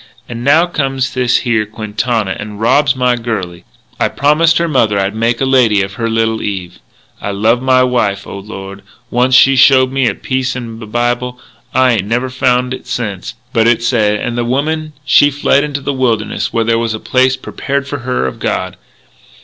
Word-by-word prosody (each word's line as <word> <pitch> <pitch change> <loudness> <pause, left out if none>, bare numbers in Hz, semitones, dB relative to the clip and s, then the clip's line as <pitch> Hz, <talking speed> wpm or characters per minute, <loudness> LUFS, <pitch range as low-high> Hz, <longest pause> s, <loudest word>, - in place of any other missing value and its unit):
And 120 0 -6
now 155 +6 +4
comes 135 -6 -2
this 125 -1 +1
here 115 -3 +2
Quintana 110 -1 -2
and 105 0 -7
robs 140 +5 +3
my 125 -1 +1
girlie.... 105 -8 -5 0.3
I - - +2
promised 155 +3 +2
her 170 - +1
mother 115 -9 +1
I'd 100 +1 -1
make 115 +2 0
a 135 - +1
lady 120 -7 +3
of 95 +1 -6
her 115 +2 -2
little 115 0 0
Eve.... 95 -4 -5 0.4
I - - -3
loved 110 +4 +1
my 130 -1 +3
wife, 105 -6 0
O 100 - -7
Lord.... 100 -1 -9 0.3
Once 125 +1 +2
she 135 +1 +6
showed 130 0 +5
me 135 -2 +1
a - - -1
piece 130 -2 -2
in 115 -3 -7
the 110 - -9
Bible, 120 +2 -2 0.3
I 130 -1 +3
ain't 105 -5 0
never 125 +4 -1
found 125 0 +1
it - - -9
sence, 100 -6 -4 0.2
but 115 0 +3
it 115 0 +2
said: 105 -4 +1
'And 120 - -3
the 120 - -1
woman 155 +5 -2
she 145 +2 +5
fled 145 0 +1
into 145 -1 -4
the 140 - -2
wilderness 115 -5 -1
where 115 - 0
there 115 0 +1
was 115 -1 -1
a - - -6
place 130 +2 +1
prepared 140 +1 -4
for 145 0 -4
her 125 - -2
of 65 - -5
God.' - - -3
120 Hz, 200 wpm, -14 LUFS, 110-130 Hz, 0.4 s, she